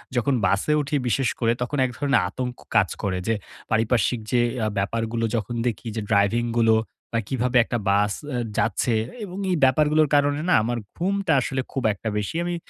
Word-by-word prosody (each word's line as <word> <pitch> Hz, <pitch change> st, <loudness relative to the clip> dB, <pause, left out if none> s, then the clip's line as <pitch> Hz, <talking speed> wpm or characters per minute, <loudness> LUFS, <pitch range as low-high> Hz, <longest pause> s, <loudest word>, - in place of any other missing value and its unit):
যখন 125 Hz, +3 st, +2 dB
বাসে 100 Hz, +11 st, +2 dB
উঠি, 145 Hz, +1 st, -2 dB
বিশেষ 130 Hz, +2 st, +1 dB
করে 115 Hz, -1 st, +2 dB
তখন 145 Hz, +4 st, -2 dB
এক 125 Hz, -, -3 dB
ধরনের 140 Hz, -8 st, +2 dB
আতঙ্ক 125 Hz, +2 st, -4 dB, 0.2 s
কাজ 100 Hz, -5 st, +4 dB
করে। 95 Hz, -2 st, 0 dB
যে 115 Hz, -, +2 dB, 0.4 s
পারিপার্শ্বিক 115 Hz, +1 st, +2 dB
যে 120 Hz, -1 st, +3 dB, 0.2 s
আ -, -, +1 dB
ব্যাপারগুলো 115 Hz, +3 st, -1 dB
যখন 115 Hz, +2 st, -2 dB
দেখি, 115 Hz, 0 st, -3 dB
যে 110 Hz, -, -2 dB
ড্রাইভিং 100 Hz, +3 st, +3 dB, 0.2 s
গুলো 110 Hz, -1 st, +5 dB, 0.4 s
আ -, -, +3 dB
কিভাবে 125 Hz, -1 st, 0 dB
একটা 120 Hz, -, -2 dB
বাস 100 Hz, +1 st, +3 dB, 0.2 s
এ -, -, -1 dB, 0.2 s
যাচ্ছে। 115 Hz, +2 st, +1 dB, 0.3 s
এবং 185 Hz, -1 st, -7 dB
এই -, -, +2 dB
ব্যাপারগুলোর 150 Hz, +3 st, +4 dB
কারণে 145 Hz, +1 st, +2 dB
না, -, -, +5 dB
আমার 120 Hz, +1 st, -1 dB, 0.2 s
ঘুমটা 195 Hz, 0 st, 0 dB
আসলে 130 Hz, +1 st, -2 dB
খুব 135 Hz, -, -3 dB
একটা 110 Hz, +2 st, -5 dB
বেশি 105 Hz, +9 st, -3 dB
আমি 175 Hz, 0 st, -2 dB
120 Hz, 185 wpm, -24 LUFS, 110-140 Hz, 0.4 s, গুলো